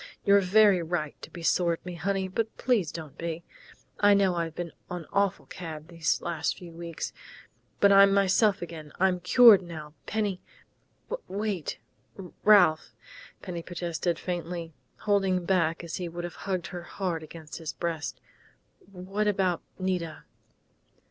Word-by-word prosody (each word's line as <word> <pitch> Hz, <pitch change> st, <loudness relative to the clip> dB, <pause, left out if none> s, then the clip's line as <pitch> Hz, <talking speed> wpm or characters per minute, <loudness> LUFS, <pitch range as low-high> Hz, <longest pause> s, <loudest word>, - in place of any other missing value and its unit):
"You've 200 Hz, -1 st, +4 dB
every 205 Hz, -4 st, +7 dB
right 160 Hz, -3 st, -2 dB
to -, -, -9 dB
be 170 Hz, -, -9 dB
sore 170 Hz, 0 st, +3 dB
at 165 Hz, -, -8 dB
me, 180 Hz, -, -5 dB
honey, 190 Hz, +3 st, -1 dB
but 220 Hz, +4 st, -3 dB
please 220 Hz, -, +1 dB
don't 155 Hz, -4 st, -8 dB
be. 170 Hz, 0 st, -4 dB, 0.6 s
I 205 Hz, 0 st, +6 dB
know 195 Hz, -2 st, +3 dB
I've 165 Hz, -2 st, -3 dB
been 175 Hz, -2 st, -4 dB, 0.2 s
an 175 Hz, -2 st, -5 dB
awful 200 Hz, -1 st, +1 dB
cad 160 Hz, -3 st, -8 dB
these 165 Hz, -2 st, 0 dB
last 170 Hz, -3 st, -1 dB
few 175 Hz, -2 st, -10 dB
weeks, 170 Hz, -1 st, -6 dB, 0.7 s
but 200 Hz, -, +6 dB
I'm 195 Hz, 0 st, +8 dB
myself 200 Hz, 0 st, +3 dB
again. 160 Hz, -3 st, -8 dB
I'm 185 Hz, -1 st, +3 dB
cured 210 Hz, +2 st, +7 dB
now, 155 Hz, -4 st, -9 dB
Penny 205 Hz, -4 st, -1 dB, 0.5 s
" -, -, -8 dB
"Wait, 200 Hz, -5 st, -3 dB, 0.7 s
Ralph!" 180 Hz, -7 st, +5 dB, 0.5 s
Penny 175 Hz, -3 st, -5 dB
protested 175 Hz, 0 st, -2 dB
faintly, 170 Hz, -2 st, -4 dB, 0.3 s
holding 195 Hz, -3 st, +1 dB
back 170 Hz, -3 st, +1 dB
as 170 Hz, -, -5 dB
he 180 Hz, -2 st, -4 dB
would 175 Hz, +1 st, -6 dB
have 175 Hz, -1 st, -5 dB, 0.2 s
hugged 185 Hz, -2 st, -1 dB
her 175 Hz, -, -4 dB
hard 175 Hz, -1 st, -3 dB
against 155 Hz, 0 st, -9 dB
his 160 Hz, -2 st, -5 dB
breast. 165 Hz, -3 st, -3 dB, 0.7 s
"What 195 Hz, +3 st, -2 dB
about 190 Hz, -4 st, +1 dB, 0.2 s
Nita?" 180 Hz, -4 st, -2 dB
180 Hz, 150 wpm, -28 LUFS, 165-195 Hz, 0.7 s, I'm